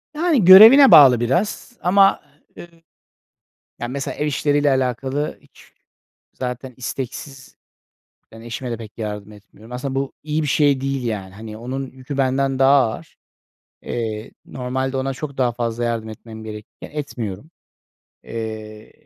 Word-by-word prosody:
Yani 310 Hz, -, +2 dB
görevine 225 Hz, +9 st, +10 dB
bağlı 130 Hz, -5 st, +8 dB
biraz. 180 Hz, -, -2 dB
Ama, 195 Hz, +2 st, +4 dB, 0.4 s
ııı, 175 Hz, -, -10 dB, 1.1 s
yani, 120 Hz, -, -4 dB
mesela 135 Hz, 0 st, -4 dB
ev 150 Hz, -, -2 dB
işleriyle 145 Hz, 0 st, +1 dB
alakalı 130 Hz, +2 st, -1 dB
hiç -, -, -22 dB, 0.6 s
zaten 125 Hz, 0 st, -6 dB
isteksiz 130 Hz, +2 st, -7 dB, 0.8 s
Ben 115 Hz, -, -12 dB
eşime 120 Hz, +2 st, -6 dB
de 115 Hz, -, -3 dB
pek 110 Hz, 0 st, -12 dB
yardım 105 Hz, -1 st, -6 dB
etmiyorum. 105 Hz, +3 st, -16 dB
Aslında 130 Hz, +2 st, -4 dB
bu 135 Hz, 0 st, -2 dB
iyi 155 Hz, +1 st, -2 dB
bir -, -, -2 dB
şey 140 Hz, -1 st, +2 dB
değil, 135 Hz, -2 st, -3 dB
yani. 100 Hz, -4 st, -4 dB
Hani, 110 Hz, 0 st, -9 dB
onun 130 Hz, +2 st, -5 dB
yükü 130 Hz, +2 st, -8 dB
benden 135 Hz, 0 st, 0 dB
daha 135 Hz, +1 st, +5 dB, 0.2 s
ağır. -, -, -11 dB, 0.7 s
Eee, 110 Hz, -2 st, -5 dB
normalde 130 Hz, +1 st, -3 dB
ona 135 Hz, +1 st, -2 dB
çok 140 Hz, 0 st, -7 dB
daha 125 Hz, -2 st, +1 dB
fazla 120 Hz, 0 st, -3 dB
yardım 115 Hz, -2 st, -2 dB
etmem 110 Hz, 0 st, -11 dB
gerekirken 105 Hz, -1 st, -10 dB
etmiyorum. 130 Hz, -, -6 dB, 0.7 s
Eee, 110 Hz, -1 st, -7 dB
130 Hz, 140 wpm, -20 LUFS, 115-140 Hz, 1.1 s, görevine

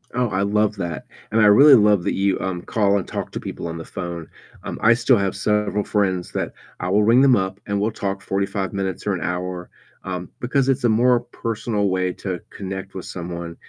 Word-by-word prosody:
Oh, 125 Hz, -2 st, +1 dB
I 95 Hz, 0 st, -1 dB
love 105 Hz, +1 st, +1 dB
that, 85 Hz, -6 st, -4 dB, 0.3 s
and 110 Hz, -, +2 dB
I 105 Hz, -, +6 dB
really 135 Hz, +7 st, +8 dB
love 105 Hz, -4 st, +4 dB
that -, -, -1 dB
you, 100 Hz, 0 st, +1 dB
um, 90 Hz, -2 st, -3 dB
call 100 Hz, -2 st, +2 dB
and 95 Hz, -, -4 dB
talk -, -, -5 dB
to -, -, -4 dB
people 85 Hz, -, -6 dB
on 85 Hz, 0 st, -5 dB
the 80 Hz, -, -7 dB
phone, 85 Hz, -3 st, -6 dB, 0.4 s
um, -, -, -6 dB
I 115 Hz, -, +6 dB
still 120 Hz, 0 st, +3 dB
have 100 Hz, -1 st, -1 dB
several 105 Hz, 0 st, 0 dB
friends 95 Hz, -4 st, -1 dB
that -, -, -3 dB, 0.3 s
I 90 Hz, -, -3 dB
will 105 Hz, +2 st, +3 dB
ring 120 Hz, +4 st, +5 dB
them 135 Hz, -3 st, +6 dB
up 95 Hz, 0 st, -2 dB
and 100 Hz, 0 st, 0 dB
we'll 110 Hz, +2 st, 0 dB
talk 100 Hz, -2 st, -3 dB
45 100 Hz, 0 st, -2 dB
minutes 95 Hz, -1 st, -3 dB
or 100 Hz, -, +1 dB
an 85 Hz, -, -3 dB
hour, 90 Hz, 0 st, -4 dB, 0.3 s
um, 90 Hz, -1 st, -5 dB
because 130 Hz, +2 st, 0 dB
it's 135 Hz, -1 st, +1 dB
a 120 Hz, -, +4 dB
more 120 Hz, +2 st, +4 dB
personal 115 Hz, -3 st, -2 dB
way 90 Hz, -1 st, 0 dB
to 90 Hz, -3 st, -5 dB
connect 95 Hz, 0 st, -7 dB
with 95 Hz, -, -6 dB
someone. 85 Hz, -1 st, -6 dB
100 Hz, 220 wpm, -22 LUFS, 90-110 Hz, 0.4 s, really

